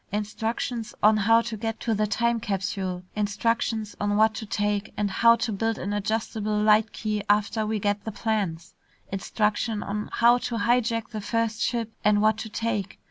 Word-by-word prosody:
Instructions 225 Hz, +2 st, -3 dB
on 215 Hz, +1 st, +7 dB
how 225 Hz, +2 st, +4 dB
to 230 Hz, -1 st, -5 dB
get 225 Hz, +1 st, -4 dB
to 230 Hz, -, 0 dB
the 215 Hz, 0 st, +1 dB
time 235 Hz, +2 st, +1 dB
capsule; 195 Hz, -3 st, -3 dB
instructions 215 Hz, +1 st, -1 dB
on 205 Hz, 0 st, +1 dB
what 220 Hz, +1 st, +4 dB
to 220 Hz, -1 st, -6 dB
take, 205 Hz, 0 st, -1 dB
and 205 Hz, -1 st, 0 dB
how 230 Hz, +4 st, +5 dB
to 235 Hz, -, -2 dB
build 225 Hz, +2 st, -1 dB
an 200 Hz, +3 st, -3 dB
adjustable 215 Hz, 0 st, -1 dB
light 215 Hz, +1 st, +4 dB
key 215 Hz, -1 st, -2 dB
after 210 Hz, +1 st, +2 dB
we 220 Hz, 0 st, 0 dB
get 205 Hz, 0 st, -1 dB
the 220 Hz, -, -4 dB
plans; 200 Hz, -7 st, -2 dB, 0.4 s
instructions 210 Hz, +2 st, -1 dB
on 210 Hz, +1 st, -4 dB
how 240 Hz, +1 st, +5 dB
to 240 Hz, -, -3 dB
hijack 230 Hz, 0 st, +1 dB
the 215 Hz, -3 st, -5 dB
first 230 Hz, +1 st, -1 dB
ship 230 Hz, -2 st, -1 dB
and 210 Hz, 0 st, +4 dB
what 215 Hz, 0 st, +3 dB
to 220 Hz, -, -5 dB
take. 210 Hz, -3 st, -3 dB
215 Hz, 180 wpm, -26 LUFS, 205-225 Hz, 0.4 s, on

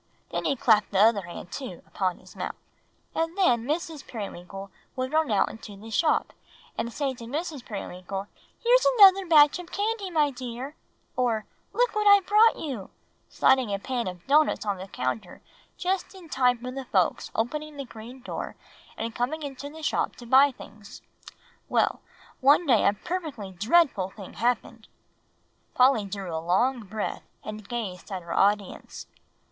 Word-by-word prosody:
Then -, -, -2 dB
he 280 Hz, -, +2 dB
clapped 220 Hz, -4 st, +3 dB
the 195 Hz, -, -2 dB
other 215 Hz, 0 st, +5 dB
hand, 175 Hz, 0 st, -9 dB
too, 255 Hz, -11 st, -7 dB
upon 185 Hz, -2 st, -2 dB
his -, -, -17 dB
mouth. -, -, -4 dB, 0.6 s
"And 330 Hz, +3 st, -1 dB
then 240 Hz, -12 st, +3 dB
Mrs. 315 Hz, 0 st, -3 dB
Periwinkle 195 Hz, -3 st, -7 dB, 0.2 s
would 260 Hz, +2 st, -3 dB
run 315 Hz, -1 st, +2 dB
out 205 Hz, -3 st, +3 dB
into 210 Hz, -2 st, -10 dB
the 220 Hz, +3 st, -11 dB
shop, 305 Hz, +8 st, +2 dB, 0.4 s
and 235 Hz, +1 st, -3 dB
say 275 Hz, +1 st, -1 dB
to 240 Hz, -2 st, -10 dB
Mr. 295 Hz, +1 st, -4 dB
Periwinkle, 195 Hz, -2 st, -6 dB, 0.4 s
'Here's -, -, +5 dB
another 390 Hz, -2 st, +8 dB
batch 300 Hz, 0 st, +6 dB
of 355 Hz, -1 st, -10 dB
candy, 415 Hz, -1 st, -1 dB
my 305 Hz, -4 st, +2 dB
dear;' 255 Hz, +3 st, -6 dB, 0.4 s
or 230 Hz, -4 st, 0 dB, 0.3 s
'Look -, -, +1 dB
what 425 Hz, 0 st, +2 dB
I've 405 Hz, -2 st, +7 dB
brought 430 Hz, +3 st, +6 dB
you,' 260 Hz, -11 st, -5 dB, 0.4 s
sliding 260 Hz, -5 st, +3 dB
a 200 Hz, -, 0 dB
pan 240 Hz, +1 st, -3 dB
of 180 Hz, -1 st, -7 dB
doughnuts 295 Hz, -3 st, +3 dB
on 200 Hz, -2 st, -1 dB
the 190 Hz, +1 st, -8 dB
counter 130 Hz, -, -4 dB, 0.3 s
just 370 Hz, +1 st, -2 dB
in 355 Hz, -4 st, -13 dB
time 250 Hz, -3 st, +3 dB
for 250 Hz, +2 st, -6 dB
the 265 Hz, 0 st, -6 dB
folks 185 Hz, -7 st, +1 dB
opening 300 Hz, +6 st, -2 dB
the 275 Hz, -, -5 dB
green 240 Hz, +2 st, -11 dB
door -, -, -5 dB, 0.4 s
and 230 Hz, 0 st, -3 dB
coming 285 Hz, +7 st, -2 dB
into 280 Hz, 0 st, -6 dB
the 315 Hz, +1 st, -11 dB
shop -, -, 0 dB
to 240 Hz, -, -12 dB
buy 265 Hz, +4 st, +6 dB
things. 215 Hz, -4 st, -13 dB, 0.7 s
Well, -, -, +1 dB, 0.4 s
one 285 Hz, +6 st, +5 dB
day 245 Hz, -7 st, +4 dB
a 200 Hz, -, +4 dB
perfectly 290 Hz, -, -5 dB
dreadful 210 Hz, -, +2 dB
thing 195 Hz, -1 st, -11 dB
happened!" 235 Hz, -1 st, -1 dB, 0.9 s
Polly 250 Hz, -4 st, +5 dB
drew 195 Hz, -4 st, -5 dB
a 160 Hz, -, -2 dB
long 230 Hz, +7 st, +1 dB
breath, 210 Hz, +2 st, -4 dB, 0.2 s
and 215 Hz, -1 st, -8 dB
gazed 210 Hz, -6 st, -5 dB
at 185 Hz, -2 st, -4 dB
her 170 Hz, -, -5 dB
audience. 200 Hz, -1 st, 0 dB
245 Hz, 165 wpm, -27 LUFS, 205-305 Hz, 0.9 s, another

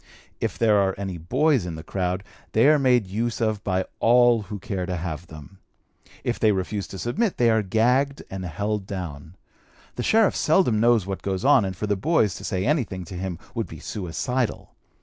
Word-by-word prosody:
If -, -, -2 dB
there 110 Hz, -3 st, +4 dB
are 95 Hz, -1 st, +1 dB
any 95 Hz, -3 st, -4 dB
boys 135 Hz, -, +2 dB
in 85 Hz, -, -5 dB
the 80 Hz, -, -8 dB
crowd, 90 Hz, +2 st, -2 dB, 0.3 s
they 115 Hz, +5 st, +5 dB
are 155 Hz, -1 st, +5 dB
made 125 Hz, -5 st, +3 dB
use 110 Hz, +5 st, -2 dB
of 110 Hz, -3 st, -1 dB
by 95 Hz, -1 st, 0 dB
all 120 Hz, -1 st, +5 dB
who 105 Hz, +1 st, -6 dB
care 95 Hz, -1 st, -4 dB
to 90 Hz, -, -2 dB
have 85 Hz, 0 st, -5 dB
them. 80 Hz, +5 st, -12 dB, 0.6 s
If 120 Hz, -, -2 dB
they 110 Hz, -, +4 dB
refuse 100 Hz, +1 st, -2 dB
to 95 Hz, -, -8 dB
submit, 180 Hz, -, -1 dB
they 120 Hz, -1 st, +4 dB
are 110 Hz, 0 st, +3 dB
gagged 125 Hz, +7 st, +1 dB
and 95 Hz, -1 st, -5 dB
held 100 Hz, +4 st, -3 dB
down. 85 Hz, -4 st, -6 dB, 0.6 s
The -, -, -1 dB
sheriff 220 Hz, -, +3 dB
seldom 155 Hz, -, +3 dB
knows 115 Hz, -3 st, +4 dB
what 95 Hz, -1 st, -4 dB
goes 95 Hz, +3 st, -2 dB
on, 140 Hz, -5 st, +6 dB
and 95 Hz, -2 st, -4 dB
for 105 Hz, -, -2 dB
the 105 Hz, -1 st, +1 dB
boys 110 Hz, -, +2 dB
to -, -, -10 dB
say 95 Hz, 0 st, -2 dB
anything 115 Hz, -, -1 dB
to 90 Hz, -, -9 dB
him 90 Hz, -1 st, -4 dB, 0.2 s
would -, -, -2 dB
be -, -, -10 dB
suicidal. 115 Hz, +6 st, -3 dB
105 Hz, 200 wpm, -24 LUFS, 95-120 Hz, 0.6 s, on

